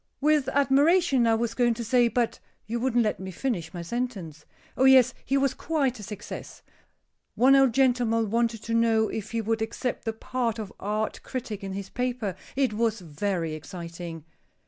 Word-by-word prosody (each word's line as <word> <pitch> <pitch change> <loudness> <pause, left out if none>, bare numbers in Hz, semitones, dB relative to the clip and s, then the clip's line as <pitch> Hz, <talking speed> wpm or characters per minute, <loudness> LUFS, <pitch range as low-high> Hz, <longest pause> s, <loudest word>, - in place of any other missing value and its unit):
"With 295 -2 +2
admiration, 280 0 +3
I 225 - +4
was 230 0 -1
going 240 -1 +2
to 235 - -4
say, 240 +1 +3
but 235 +1 -1 0.3
you 235 +2 -3
wouldn't 240 -1 +2
let 215 - -1
me 190 0 -6
finish 185 -4 -3
my 175 -1 -6
sentence. 190 -8 -5 0.3
Oh, 260 - +3
yes, 260 -1 +7
he 275 - +1
was 275 -1 +2
quite 275 -7 -1
a - - -7
success. 210 0 -8 0.7
One 265 +3 +6
old 270 -2 +5
gentleman 240 -5 +2
wanted 230 -1 0
to 230 - -3
know 225 -1 +3
if 220 -1 -5
he 230 0 -1
would 225 +1 -1
accept 235 +3 -3
the 225 - -1
part 235 0 -2
of 215 -3 -6
art 215 +2 -2
critic 230 -6 -5
on 195 -1 -4
his 195 0 -6
paper. 245 -5 -2 0.2
It 265 -4 +1
was 225 0 0
very 170 0 -2
exciting." 170 0 -8
230 Hz, 180 wpm, -26 LUFS, 205-255 Hz, 0.7 s, yes